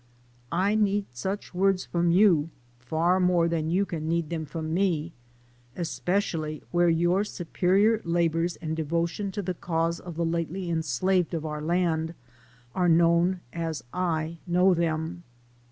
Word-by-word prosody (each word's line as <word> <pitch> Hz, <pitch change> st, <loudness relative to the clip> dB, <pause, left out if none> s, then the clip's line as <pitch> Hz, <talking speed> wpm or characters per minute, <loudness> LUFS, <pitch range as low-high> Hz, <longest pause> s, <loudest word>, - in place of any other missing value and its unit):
I 190 Hz, +4 st, +2 dB
need 205 Hz, -1 st, +2 dB
such 190 Hz, +13 st, -4 dB
words 190 Hz, 0 st, +2 dB
from 170 Hz, 0 st, 0 dB
you 170 Hz, -4 st, +4 dB, 0.3 s
far 160 Hz, +8 st, +1 dB
more 180 Hz, -2 st, +3 dB
than 160 Hz, -2 st, -1 dB
you 190 Hz, +4 st, +2 dB
can 165 Hz, -4 st, -4 dB
need 170 Hz, -1 st, -1 dB
them 160 Hz, -2 st, -2 dB
from 160 Hz, +2 st, -4 dB
me, 170 Hz, -3 st, 0 dB, 0.6 s
especially 165 Hz, -3 st, -2 dB
where 175 Hz, 0 st, +3 dB
your 175 Hz, +4 st, +2 dB
superior 200 Hz, +3 st, +1 dB
labors 170 Hz, 0 st, +1 dB
and 160 Hz, -1 st, -4 dB
'devotion 170 Hz, +5 st, -1 dB
to 205 Hz, 0 st, -3 dB
the 185 Hz, 0 st, -2 dB
cause 165 Hz, -1 st, -1 dB
of 175 Hz, -2 st, -9 dB
the 170 Hz, +1 st, -1 dB
lately 170 Hz, +2 st, -2 dB
enslaved 175 Hz, +2 st, 0 dB
of 160 Hz, -1 st, -3 dB
our 150 Hz, -1 st, -4 dB
land 165 Hz, 0 st, 0 dB, 0.6 s
are 180 Hz, -2 st, +2 dB
known 170 Hz, +2 st, +3 dB
as 165 Hz, -2 st, -3 dB
I 165 Hz, -2 st, -1 dB
know 180 Hz, +2 st, +4 dB
them. 165 Hz, 0 st, -1 dB
170 Hz, 145 wpm, -27 LUFS, 160-185 Hz, 0.6 s, you